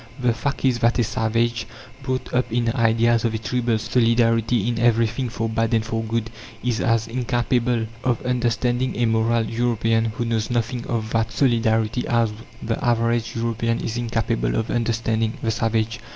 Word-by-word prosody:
The 125 Hz, -2 st, +2 dB
fact 140 Hz, +3 st, -3 dB
is 125 Hz, -3 st, +2 dB
that 115 Hz, 0 st, +2 dB
a 120 Hz, -, +3 dB
savage, 115 Hz, +1 st, 0 dB, 0.3 s
brought 130 Hz, -1 st, -3 dB
up 125 Hz, -1 st, 0 dB
in 120 Hz, 0 st, +1 dB
ideas 115 Hz, -1 st, +2 dB
of 115 Hz, -1 st, 0 dB
a -, -, +1 dB
tribal 115 Hz, +1 st, 0 dB
solidarity 115 Hz, -1 st, +2 dB
in 120 Hz, -1 st, -1 dB
everything 115 Hz, +1 st, +2 dB
for 115 Hz, -1 st, -2 dB
bad 115 Hz, +1 st, 0 dB
and 110 Hz, -1 st, +1 dB
for 115 Hz, -1 st, -2 dB
good, 115 Hz, 0 st, -2 dB, 0.3 s
is 120 Hz, -2 st, 0 dB
as 115 Hz, -1 st, +2 dB
incapable 120 Hz, -1 st, 0 dB, 0.2 s
of 125 Hz, -2 st, +1 dB
understanding 125 Hz, +1 st, 0 dB
a 120 Hz, -, +2 dB
"moral" 115 Hz, +1 st, +2 dB
European, 115 Hz, -1 st, +1 dB
who 115 Hz, +2 st, -3 dB
knows 115 Hz, -1 st, -1 dB
nothing 120 Hz, 0 st, -2 dB
of 110 Hz, -2 st, -2 dB
that 115 Hz, 0 st, 0 dB
solidarity, 115 Hz, 0 st, +1 dB
as 115 Hz, -2 st, +2 dB, 0.3 s
the 115 Hz, +4 st, -2 dB
average 115 Hz, -1 st, +1 dB
European 115 Hz, 0 st, -1 dB
is 115 Hz, -, -3 dB
incapable 115 Hz, -, -1 dB
of 110 Hz, -, -1 dB
understanding 115 Hz, -1 st, 0 dB
the 115 Hz, -, +1 dB
savage. 115 Hz, 0 st, -1 dB
115 Hz, 165 wpm, -22 LUFS, 115-120 Hz, 0.3 s, a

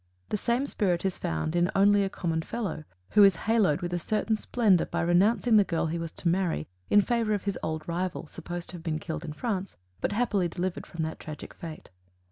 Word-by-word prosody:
The -, -, 0 dB
same 240 Hz, +6 st, 0 dB
spirit 195 Hz, -9 st, 0 dB
is 190 Hz, -, -1 dB
found 80 Hz, -, -2 dB
in 175 Hz, +1 st, +3 dB
"Only 200 Hz, +1 st, +5 dB
a 195 Hz, -, 0 dB
Common 165 Hz, -3 st, -2 dB
Fellow," 195 Hz, -6 st, -4 dB, 0.3 s
who 210 Hz, -, +7 dB
is 195 Hz, -3 st, +7 dB
haloed 215 Hz, -9 st, +3 dB
with 175 Hz, 0 st, -3 dB
a 175 Hz, -, 0 dB
certain 215 Hz, +5 st, 0 dB
splendor 215 Hz, -5 st, +2 dB
by -, -, -1 dB
renouncing 210 Hz, +7 st, +4 dB
the 205 Hz, -, +7 dB
girl 170 Hz, -4 st, -1 dB
he 165 Hz, +1 st, -2 dB
was 165 Hz, -1 st, -4 dB
to -, -, -3 dB
marry 170 Hz, -, +1 dB, 0.2 s
in 205 Hz, -, +6 dB
favor 230 Hz, -1 st, +1 dB
of 200 Hz, -, -4 dB
his 200 Hz, -2 st, -2 dB
old 155 Hz, -1 st, -3 dB
rival, 175 Hz, +1 st, -2 dB
supposed 175 Hz, +3 st, -7 dB
to 180 Hz, -, -6 dB
have 165 Hz, -, -12 dB
been 160 Hz, -2 st, -1 dB
killed 160 Hz, 0 st, -5 dB
in 155 Hz, -3 st, -5 dB
France, 195 Hz, 0 st, -3 dB, 0.2 s
but -, -, -1 dB
happily 205 Hz, -5 st, +1 dB
delivered 175 Hz, +1 st, -3 dB
from 165 Hz, -1 st, -4 dB
that 160 Hz, 0 st, -4 dB
tragic 155 Hz, -2 st, -8 dB
fate. 160 Hz, -2 st, -9 dB
180 Hz, 220 wpm, -28 LUFS, 165-205 Hz, 0.3 s, who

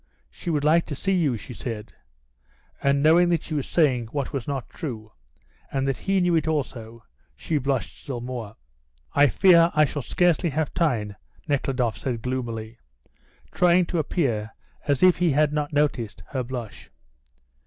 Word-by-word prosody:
She 175 Hz, -, -7 dB
would 150 Hz, -3 st, 0 dB
like 165 Hz, +3 st, +3 dB
to 145 Hz, -, -4 dB
see 195 Hz, +8 st, -1 dB
you," 155 Hz, -10 st, +1 dB
she 125 Hz, -, -10 dB
said, 115 Hz, -3 st, -6 dB, 0.9 s
and 140 Hz, 0 st, +2 dB
knowing 170 Hz, +3 st, +5 dB
that 170 Hz, -3 st, +1 dB
she 160 Hz, -, -7 dB
was 145 Hz, -3 st, -2 dB
saying 130 Hz, -8 st, +2 dB
what 140 Hz, +3 st, -4 dB
was 135 Hz, -4 st, -3 dB
not 135 Hz, -4 st, -3 dB
true, 110 Hz, -9 st, -7 dB, 0.6 s
and 135 Hz, 0 st, -1 dB
that 135 Hz, -, 0 dB
he 195 Hz, 0 st, 0 dB
knew 180 Hz, -1 st, +2 dB
it 160 Hz, -1 st, +1 dB
also, 115 Hz, -7 st, -3 dB, 0.3 s
she 155 Hz, -, -1 dB
blushed 135 Hz, -2 st, -2 dB
still 130 Hz, -4 st, -5 dB
more. 120 Hz, -3 st, -6 dB, 0.6 s
"I 145 Hz, 0 st, +6 dB
fear 170 Hz, -, +5 dB
I 155 Hz, 0 st, +5 dB
shall 145 Hz, +1 st, -4 dB
scarcely 175 Hz, +4 st, +2 dB
have 155 Hz, 0 st, -2 dB
time," 115 Hz, -, 0 dB, 0.3 s
Nekhludoff 130 Hz, -5 st, 0 dB
said 120 Hz, -4 st, -3 dB
gloomily, 120 Hz, -3 st, -4 dB, 0.7 s
trying 180 Hz, 0 st, +4 dB
to 170 Hz, 0 st, -2 dB
appear 120 Hz, -9 st, -1 dB, 0.4 s
as 140 Hz, 0 st, +1 dB
if 185 Hz, -1 st, +6 dB
he 175 Hz, -1 st, +2 dB
had 150 Hz, +1 st, +2 dB
not 150 Hz, 0 st, -1 dB
noticed 125 Hz, -, -1 dB
her 130 Hz, -, -2 dB
blush. 120 Hz, -3 st, -7 dB
140 Hz, 165 wpm, -24 LUFS, 120-160 Hz, 0.9 s, I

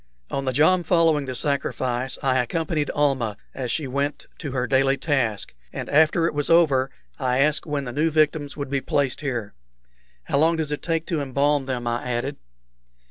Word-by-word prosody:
On 135 Hz, -, -2 dB
the 130 Hz, -, +1 dB
jom 155 Hz, +7 st, +4 dB
following 165 Hz, -3 st, +3 dB
the 130 Hz, -1 st, -5 dB
sacrifice 130 Hz, -2 st, -1 dB
I 130 Hz, -1 st, +2 dB
accompanied 155 Hz, +3 st, -1 dB
Almah 135 Hz, -8 st, +1 dB, 0.2 s
as 130 Hz, -2 st, -4 dB
she 155 Hz, -, 0 dB
went 140 Hz, +2 st, -2 dB
to 145 Hz, -, -5 dB
her 125 Hz, -1 st, -1 dB
daily 135 Hz, +1 st, +2 dB
task, 125 Hz, -10 st, -1 dB, 0.2 s
and -, -, -5 dB
after 160 Hz, +2 st, +4 dB
it -, -, 0 dB
was 145 Hz, -1 st, -1 dB
over 145 Hz, -6 st, +4 dB, 0.3 s
I 125 Hz, -2 st, +1 dB
asked 150 Hz, +4 st, +2 dB
when 145 Hz, -2 st, -1 dB
the 125 Hz, -, -5 dB
new 155 Hz, +4 st, +2 dB
victims 155 Hz, -2 st, +1 dB
would 140 Hz, -2 st, -5 dB
be 140 Hz, -1 st, 0 dB
placed 140 Hz, -1 st, 0 dB
here. 120 Hz, -8 st, -3 dB, 0.7 s
"How 140 Hz, -, 0 dB
long 165 Hz, +2 st, +4 dB
does 155 Hz, -2 st, -2 dB
it 150 Hz, -, -3 dB
take 165 Hz, -1 st, -1 dB
to 165 Hz, -5 st, -1 dB
embalm 140 Hz, +1 st, +1 dB
them?" 125 Hz, -2 st, -3 dB
I 120 Hz, 0 st, -1 dB
added. 120 Hz, -1 st, -2 dB
140 Hz, 190 wpm, -24 LUFS, 130-155 Hz, 0.7 s, jom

